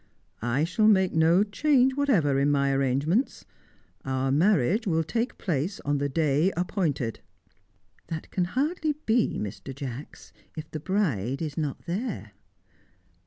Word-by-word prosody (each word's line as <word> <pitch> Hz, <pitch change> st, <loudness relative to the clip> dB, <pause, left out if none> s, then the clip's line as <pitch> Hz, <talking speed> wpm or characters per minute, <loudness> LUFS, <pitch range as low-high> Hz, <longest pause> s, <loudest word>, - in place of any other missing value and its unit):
"I 120 Hz, +6 st, 0 dB
shall 215 Hz, +6 st, +2 dB
make 190 Hz, -3 st, +4 dB
no 165 Hz, +4 st, +4 dB
change 265 Hz, +4 st, +2 dB
whatever 185 Hz, -, +2 dB
in 140 Hz, +1 st, +2 dB
my 140 Hz, -1 st, +2 dB
arrangements. 140 Hz, -, 0 dB, 0.6 s
Our 130 Hz, 0 st, -1 dB
marriage 190 Hz, -, +2 dB
will 165 Hz, -2 st, +2 dB
take 230 Hz, +10 st, -2 dB
place 170 Hz, +2 st, -2 dB
on 145 Hz, 0 st, 0 dB
the 140 Hz, 0 st, -1 dB
day 155 Hz, +4 st, +2 dB
appointed." 160 Hz, -, -1 dB, 0.9 s
"That 160 Hz, -1 st, -6 dB
can 180 Hz, -, 0 dB
hardly 300 Hz, -, -1 dB
be, 225 Hz, +1 st, +2 dB
Mr. 105 Hz, +4 st, -6 dB
Jacks, 140 Hz, +1 st, -8 dB, 0.2 s
if 155 Hz, 0 st, -7 dB
the 155 Hz, -, -4 dB
bride 140 Hz, -, -1 dB
is 155 Hz, -3 st, -4 dB
not 150 Hz, -4 st, -3 dB
there." 190 Hz, -, -4 dB
160 Hz, 135 wpm, -27 LUFS, 140-205 Hz, 0.9 s, make